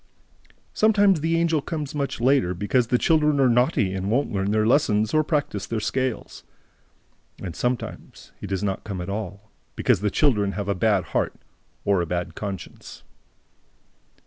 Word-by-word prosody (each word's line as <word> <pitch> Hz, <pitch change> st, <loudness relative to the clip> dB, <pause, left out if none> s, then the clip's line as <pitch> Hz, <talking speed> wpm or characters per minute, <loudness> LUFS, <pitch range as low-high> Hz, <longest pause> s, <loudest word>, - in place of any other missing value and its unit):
Sometimes, 205 Hz, -6 st, +4 dB
the 165 Hz, +1 st, +1 dB
Angel 165 Hz, -2 st, +1 dB
comes 150 Hz, -2 st, -5 dB
much 140 Hz, -4 st, -3 dB
later, 125 Hz, -7 st, +2 dB
because 115 Hz, +6 st, +1 dB
the 125 Hz, -, +2 dB
children 150 Hz, 0 st, +2 dB
are 135 Hz, -, +5 dB
naughty 120 Hz, -5 st, +2 dB
and 95 Hz, +1 st, -3 dB
won't 130 Hz, +6 st, +1 dB
learn 100 Hz, -1 st, -1 dB
their 110 Hz, +1 st, +2 dB
lessons 110 Hz, -4 st, +2 dB
or 155 Hz, 0 st, +4 dB
practise 145 Hz, -, -2 dB
their 115 Hz, -, -2 dB
scales. 130 Hz, +2 st, -3 dB, 1.0 s
And, 90 Hz, -3 st, -6 dB
sometimes, 125 Hz, -1 st, -4 dB
he -, -, -5 dB
does 95 Hz, 0 st, -2 dB
not 95 Hz, -2 st, -2 dB
come 100 Hz, -4 st, -5 dB
at 90 Hz, +2 st, -4 dB
all, 100 Hz, 0 st, -6 dB, 0.2 s
because -, -, +2 dB
the 105 Hz, -, +1 dB
children 105 Hz, -6 st, +2 dB
have 100 Hz, -1 st, -4 dB
a 100 Hz, -, +1 dB
bad 100 Hz, -1 st, +2 dB
heart -, -, 0 dB, 0.5 s
or 100 Hz, -3 st, +3 dB
a 85 Hz, -, -3 dB
bad 85 Hz, +1 st, -3 dB
conscience. 100 Hz, -3 st, -8 dB
110 Hz, 165 wpm, -24 LUFS, 100-145 Hz, 1.0 s, are